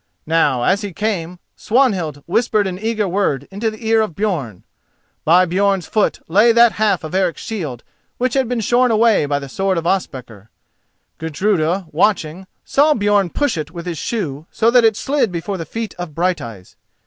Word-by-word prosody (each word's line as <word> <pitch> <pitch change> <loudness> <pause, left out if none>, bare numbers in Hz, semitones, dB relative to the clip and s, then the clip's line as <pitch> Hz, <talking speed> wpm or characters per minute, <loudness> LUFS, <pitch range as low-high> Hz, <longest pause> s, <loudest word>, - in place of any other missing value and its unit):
Now, 150 -6 +2
as 200 - +2
he 205 -3 -6
came, 180 -4 -3 0.2
Swanhild 190 - 0
whispered 215 +2 +1
an 185 -1 -4
eager 220 -1 -1
word 175 -8 -1
into 210 +4 -2
the 215 +1 -10
ear 225 0 +4
of 215 -7 -3
Björn. 160 - -3 0.6
By 180 +4 +5
Björn's 195 +1 +1
foot 215 - 0
lay 210 +8 +5
that 235 0 +6
half 205 -5 0
of 155 - -7
Eric's 185 -2 0
shield 155 - -5 0.3
which 250 -1 -1
had 265 -3 +1
been 245 -2 -1
shorn 245 +4 +2
away 220 -8 +3
by 145 0 0
the 140 -1 -6
sword 190 +6 -1
of 165 - -3
Ospakar. 125 - -3 0.7
Gudruda, 170 +2 0
watching, 180 0 0 0.2
saw 295 +2 +3
Björn 205 -4 +1
push 285 - -1
it 150 - -5
with 170 +1 -8
his 170 -4 -4
shoe 160 - -4
so 230 +1 +2
that 245 -1 +5
it 220 -2 +3
slid 275 -7 0
before 180 +3 -4
the 165 - -4
feet 225 -1 -4
of 170 -4 -6
Brighteyes. 120 - -3
190 Hz, 180 wpm, -18 LUFS, 160-220 Hz, 0.7 s, that